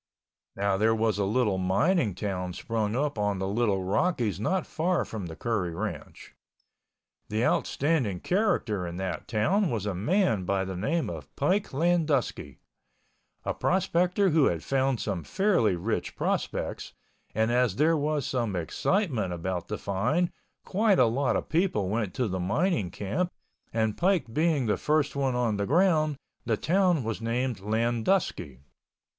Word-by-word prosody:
Now 100 -1 +1
there 110 +2 +3
was 110 -2 +1
a 100 - +2
little 105 -2 +1
mining 105 - +2
town 90 -3 -3
sprung 110 +2 -2
up 140 -3 -1
in 105 -1 0
the 95 +1 -2
Little 100 -2 +1
Rockies 105 - 0
not 180 - 0
far 175 +2 0
from 105 -5 -6
the 80 - -8
Curry 95 -7 -2
Ranch. - - -6 1.0
The 110 +3 0
outstanding 135 - +1
character 125 - 0
in 85 0 -6
that 95 -1 -4
town 170 - +1
was 110 -6 -2
a 105 - -1
man 110 - +1
by 95 +1 0
the 95 0 -5
name 145 - -1
of 80 -5 -7
Pike 185 +8 +1
Landusky, 160 -3 0 0.9
a - - 0
prospector 180 +1 +1
who 155 -2 +4
had 85 -2 0
found 135 -2 +1
some 95 -6 -3
fairly 185 - +2
rich 105 +6 -3
prospects, - - -2 0.4
and 110 +2 +2
as 120 -5 +2
there 155 +6 +3
was 150 -2 0
some 115 -7 -1
excitement 115 - 0
about 90 +1 -3
the 105 - -3
find 125 - 0 0.3
quite 205 0 +2
a 125 - +6
lot 125 +4 +1
of - - -2
people 160 - +1
went 105 -3 -2
to 125 - 0
the 95 -2 -3
mining 125 - 0
camp 105 - -2 0.4
and 110 -2 0
Pike 175 -10 +1
being 155 -1 +2
about 110 -3 +1
the - - -2
first 150 -1 +1
one 135 -2 0
on 115 -4 +1
the 100 -1 -1
ground, 155 -2 +3 0.3
the - - 0
town 180 -4 +2
was 115 0 -3
named 120 0 -1
Landusky. 115 - 0
115 Hz, 160 wpm, -28 LUFS, 100-160 Hz, 1.0 s, a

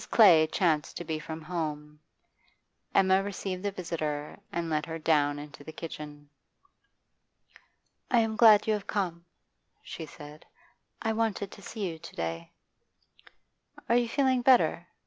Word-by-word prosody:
Clay 170 -8 +7
chanced 160 -5 +1
to - - -5
be 160 -1 -3
from 160 +1 -7
home; 150 -3 -4 1.0
Emma 190 0 +5
received 195 -2 -4
the 205 - -1
visitor 155 -6 -4
and 170 -1 -2
led 155 -1 0
her 165 0 -4
down 150 -2 +2
into 145 0 -10
the 160 - -8
kitchen. 150 -2 -8 1.8
'I 240 - +4
am 220 -1 -1
glad 215 -3 +7
you 220 - +2
have 210 -2 -4
come,' 175 -4 -2 0.6
she 160 - -7
said; 150 +1 -12 0.6
'I 225 -1 +1
wanted 215 -3 -1
to - - -12
see 210 -1 -4
you 165 -2 -6
to 170 - -11
day.' 85 0 -4 1.4
'Are 235 - +3
you 240 -1 +2
feeling 260 -1 +2
better? 250 0 +4
170 Hz, 145 wpm, -29 LUFS, 150-205 Hz, 1.8 s, Clay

